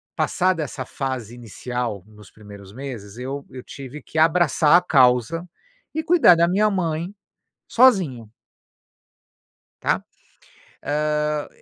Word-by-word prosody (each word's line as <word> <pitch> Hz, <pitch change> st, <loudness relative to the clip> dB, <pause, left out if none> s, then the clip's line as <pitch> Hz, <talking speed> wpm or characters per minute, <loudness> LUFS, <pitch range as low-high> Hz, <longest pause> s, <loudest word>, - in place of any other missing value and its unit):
passada 180 Hz, -4 st, 0 dB
essa 130 Hz, -2 st, -6 dB
fase 130 Hz, -5 st, -5 dB
inicial, 120 Hz, -3 st, -5 dB
nos 105 Hz, -3 st, -16 dB
primeiros 100 Hz, -2 st, -13 dB
meses 120 Hz, -5 st, -8 dB
eu 135 Hz, +3 st, -5 dB
eu 130 Hz, -1 st, -9 dB
tive 140 Hz, +1 st, -9 dB
que 155 Hz, -, -9 dB
abraçar 165 Hz, -1 st, +4 dB
a -, -, +2 dB
causa 130 Hz, +2 st, +3 dB, 0.5 s
e 315 Hz, -, -1 dB
cuidar 320 Hz, -, +6 dB
da 170 Hz, +1 st, +3 dB
minha 210 Hz, +4 st, +2 dB
mãe 170 Hz, -2 st, -2 dB, 0.6 s
sozinho 180 Hz, -, +3 dB, 1.5 s
está? -, -, 0 dB, 0.8 s
hã, 150 Hz, 0 st, -1 dB
140 Hz, 115 wpm, -22 LUFS, 120-170 Hz, 1.5 s, cuidar